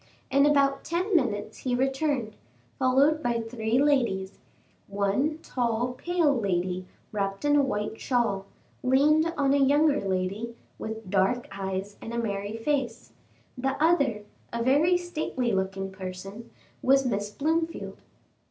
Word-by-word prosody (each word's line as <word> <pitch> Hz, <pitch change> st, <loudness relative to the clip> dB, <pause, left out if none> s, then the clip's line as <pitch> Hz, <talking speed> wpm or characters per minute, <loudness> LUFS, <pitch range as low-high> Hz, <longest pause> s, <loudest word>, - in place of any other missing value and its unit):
In 280 Hz, +1 st, +5 dB
about 280 Hz, -2 st, +3 dB
ten 360 Hz, +4 st, -1 dB
minutes 235 Hz, -10 st, 0 dB
he 250 Hz, -2 st, -1 dB
returned, 265 Hz, -3 st, 0 dB, 0.4 s
followed 275 Hz, +4 st, +3 dB
by 240 Hz, -4 st, 0 dB
three 225 Hz, 0 st, -1 dB
ladies; 240 Hz, -10 st, +1 dB, 0.5 s
one 205 Hz, +10 st, 0 dB
tall, 240 Hz, 0 st, -1 dB
pale 340 Hz, +1 st, +1 dB
lady, 185 Hz, -4 st, -1 dB, 0.2 s
wrapped 195 Hz, +3 st, -2 dB
in 290 Hz, 0 st, +4 dB
a 290 Hz, -, +5 dB
white 220 Hz, -5 st, -2 dB
shawl, 225 Hz, -6 st, 0 dB, 0.3 s
leaned 300 Hz, +5 st, +4 dB
on 275 Hz, -1 st, +3 dB
a 285 Hz, -, +3 dB
younger 290 Hz, +2 st, +4 dB
lady, 195 Hz, +4 st, -2 dB, 0.2 s
with 220 Hz, -3 st, -6 dB
dark 200 Hz, +5 st, +2 dB
eyes 195 Hz, +1 st, -4 dB
and 230 Hz, -, -6 dB
a -, -, -2 dB
merry 205 Hz, -1 st, -2 dB
face; 250 Hz, -2 st, -2 dB, 0.4 s
the 270 Hz, +2 st, -2 dB
other, 280 Hz, -10 st, +2 dB, 0.3 s
a 235 Hz, 0 st, -2 dB
very 300 Hz, +8 st, +4 dB
stately 310 Hz, -8 st, -2 dB
looking 190 Hz, 0 st, -2 dB
person, 190 Hz, +4 st, -8 dB, 0.3 s
was 270 Hz, +1 st, +4 dB
Miss 205 Hz, -4 st, -1 dB
Blomefield. 325 Hz, +7 st, -2 dB
245 Hz, 135 wpm, -27 LUFS, 205-285 Hz, 0.5 s, In